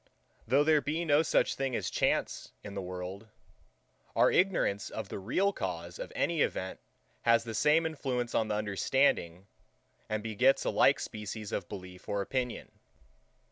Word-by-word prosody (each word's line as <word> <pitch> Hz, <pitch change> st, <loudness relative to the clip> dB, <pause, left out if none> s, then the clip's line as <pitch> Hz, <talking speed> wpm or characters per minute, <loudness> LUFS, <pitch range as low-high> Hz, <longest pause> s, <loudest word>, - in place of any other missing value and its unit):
Though 135 Hz, +5 st, +4 dB
there 155 Hz, -1 st, +4 dB
be 160 Hz, +4 st, -2 dB
no 145 Hz, -1 st, +5 dB
such 160 Hz, -, +2 dB
thing 135 Hz, -2 st, -2 dB
as -, -, -2 dB
Chance -, -, 0 dB
in 100 Hz, -, -8 dB
the 100 Hz, -, -3 dB
world; 90 Hz, +3 st, -6 dB, 0.9 s
our -, -, +5 dB
ignorance 175 Hz, -, +1 dB
of 110 Hz, -3 st, -6 dB
the -, -, -5 dB
real 185 Hz, -, +1 dB
cause 85 Hz, -, -5 dB
of -, -, -6 dB
any 170 Hz, -3 st, +1 dB
event 95 Hz, 0 st, -1 dB, 0.4 s
has 115 Hz, 0 st, +4 dB
the 115 Hz, -1 st, -6 dB
same 150 Hz, +8 st, +3 dB
influence 130 Hz, -6 st, -2 dB
on 110 Hz, -, +1 dB
the 105 Hz, -, -1 dB
understanding, 100 Hz, -3 st, +1 dB, 0.6 s
and 110 Hz, -1 st, -2 dB
begets 115 Hz, +5 st, +2 dB
a -, -, +1 dB
like -, -, +4 dB
species 105 Hz, 0 st, -6 dB
of -, -, -3 dB
belief 90 Hz, -2 st, -9 dB
or 100 Hz, -1 st, 0 dB
opinion. 125 Hz, +3 st, -4 dB
110 Hz, 160 wpm, -31 LUFS, 100-140 Hz, 0.9 s, no